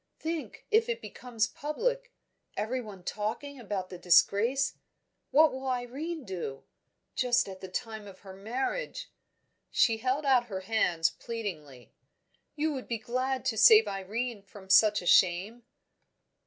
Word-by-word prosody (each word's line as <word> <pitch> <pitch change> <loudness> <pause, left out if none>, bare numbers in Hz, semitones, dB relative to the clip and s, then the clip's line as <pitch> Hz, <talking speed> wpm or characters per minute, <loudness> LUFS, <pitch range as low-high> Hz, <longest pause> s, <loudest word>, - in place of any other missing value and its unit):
Think, 320 -1 -5
if 450 +2 +3
it 475 0 -1
becomes 240 - -3
public - - -3 0.5
everyone 215 -4 -4
talking 225 +9 -4
about 200 -5 -4
the 180 - -8
disgrace 210 +10 +3 0.6
what 310 +1 +5
will 265 +1 -5
Irene 265 +6 -3
do? 170 -9 -5 0.5
Just 245 -2 +2
at 190 -1 -9
the 190 - -6
time 215 +2 -5
of 190 -1 -13
her 195 -1 -11
marriage!" 265 - -4 0.6
She 225 -3 +3
held 260 +6 -1
out 255 -3 +4
her 190 -3 -5
hands, 185 -5 +1
pleadingly. 155 - -7 0.6
"You 310 0 0
would 260 -2 -6
be 235 - -2
glad 255 +4 -2
to 225 - 0
save 440 - +8
Irene 210 +4 -3
from 195 -1 -10
such 210 -3 +5
a - - -10
shame?" 190 +7 +3
230 Hz, 140 wpm, -29 LUFS, 195-270 Hz, 0.6 s, save